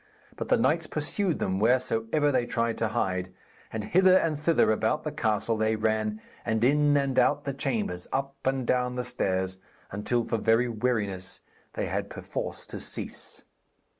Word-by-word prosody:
But -, -, -4 dB
the -, -, +5 dB
knights -, -, +2 dB
pursued 195 Hz, -6 st, -1 dB
them 95 Hz, 0 st, -1 dB
wheresoever 125 Hz, +4 st, +2 dB
they 125 Hz, -3 st, +1 dB
tried 115 Hz, -1 st, 0 dB
to 115 Hz, -, +1 dB
hide, 95 Hz, -5 st, -1 dB, 0.4 s
and 110 Hz, -1 st, -3 dB
hither 185 Hz, -, +5 dB
and 165 Hz, -4 st, +1 dB
thither 150 Hz, -4 st, +3 dB
about 110 Hz, -, +1 dB
the -, -, -3 dB
castle 110 Hz, +1 st, 0 dB
they 110 Hz, 0 st, +2 dB
ran, 110 Hz, 0 st, 0 dB, 0.2 s
and 110 Hz, 0 st, 0 dB
in 145 Hz, +2 st, +4 dB
and 140 Hz, -2 st, +1 dB
out 145 Hz, 0 st, +3 dB
the 140 Hz, -, -3 dB
chambers, 110 Hz, -10 st, -2 dB
up 135 Hz, +1 st, -1 dB
and 130 Hz, -1 st, 0 dB
down 125 Hz, 0 st, +1 dB
the 125 Hz, -, -1 dB
stairs, 95 Hz, -6 st, -1 dB, 0.3 s
until 115 Hz, +4 st, -1 dB
for 115 Hz, -, -1 dB
very 115 Hz, +3 st, +3 dB
weariness 105 Hz, -5 st, -2 dB, 0.3 s
they -, -, -2 dB
had -, -, -2 dB
perforce -, -, -5 dB
to -, -, -7 dB
cease. -, -, -5 dB
115 Hz, 165 wpm, -28 LUFS, 110-135 Hz, 0.4 s, the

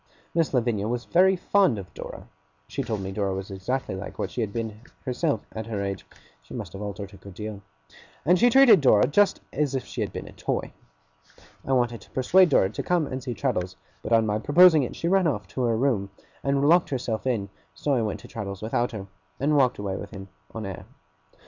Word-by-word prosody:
Miss 165 Hz, -2 st, +1 dB
Lavinia 115 Hz, -5 st, 0 dB
was 120 Hz, +1 st, -2 dB
very 190 Hz, +2 st, +4 dB
fond 185 Hz, -, +2 dB
of 95 Hz, -3 st, -9 dB
Dora -, -, -8 dB, 0.4 s
(she -, -, -3 dB
told 110 Hz, -3 st, -3 dB
me 95 Hz, 0 st, -4 dB
Dora 95 Hz, -1 st, -1 dB
was 95 Hz, +1 st, -6 dB
exactly 100 Hz, +6 st, -3 dB
like 95 Hz, +1 st, -7 dB
what -, -, -3 dB
she 125 Hz, -, -3 dB
had 105 Hz, -3 st, -2 dB
been 110 Hz, -1 st, -4 dB, 0.2 s
herself 130 Hz, -1 st, -1 dB
at 110 Hz, 0 st, -6 dB
her 105 Hz, -3 st, -2 dB
age 100 Hz, -1 st, -4 dB, 0.3 s
she -, -, -11 dB
must -, -, -6 dB
have 95 Hz, -, -7 dB
altered 100 Hz, -1 st, -6 dB
a -, -, -12 dB
good 100 Hz, -2 st, -13 dB
deal), 105 Hz, -1 st, -6 dB, 0.6 s
and 180 Hz, +2 st, +4 dB
she 245 Hz, -, +6 dB
treated 240 Hz, -, +7 dB
Dora 110 Hz, -6 st, +5 dB
just 200 Hz, +9 st, +3 dB
as 145 Hz, -3 st, 0 dB
if 130 Hz, -, -2 dB
she -, -, -5 dB
had -, -, -2 dB
been -, -, -6 dB
a -, -, -10 dB
toy. -, -, -3 dB, 0.9 s
I 135 Hz, -, -1 dB
wanted 120 Hz, -2 st, +1 dB
to -, -, -17 dB
persuade 180 Hz, +8 st, +4 dB
Dora 95 Hz, -9 st, +3 dB
to -, -, -4 dB
come 175 Hz, -3 st, +1 dB
and 130 Hz, -1 st, -5 dB
see 125 Hz, -2 st, -4 dB
Traddles, 90 Hz, -2 st, -1 dB, 0.3 s
but -, -, -6 dB
on 115 Hz, -1 st, +5 dB
my 105 Hz, 0 st, 0 dB
proposing 160 Hz, +4 st, +6 dB
it 125 Hz, -, -4 dB
she 170 Hz, -, -2 dB
ran 190 Hz, -1 st, +3 dB
off 105 Hz, -10 st, -2 dB
to 130 Hz, -, -4 dB
her 115 Hz, -, +2 dB
own 110 Hz, -, -1 dB
room 110 Hz, -8 st, +1 dB, 0.3 s
and 140 Hz, +1 st, +2 dB
locked 175 Hz, +2 st, +5 dB
herself 125 Hz, -3 st, -2 dB
in; 105 Hz, -6 st, -1 dB, 0.3 s
so 140 Hz, -, 0 dB
I 125 Hz, -, +2 dB
went 110 Hz, -2 st, -3 dB
to -, -, -12 dB
Traddles 100 Hz, -2 st, -6 dB
without 120 Hz, +2 st, 0 dB
her, 100 Hz, -3 st, -5 dB, 0.3 s
and 150 Hz, +3 st, +2 dB
walked 130 Hz, -3 st, +3 dB
away 100 Hz, -2 st, -3 dB
with 100 Hz, -, -7 dB
him 100 Hz, -2 st, -9 dB, 0.2 s
on 110 Hz, -2 st, -6 dB
air. 95 Hz, -3 st, -7 dB
115 Hz, 225 wpm, -26 LUFS, 100-145 Hz, 0.9 s, treated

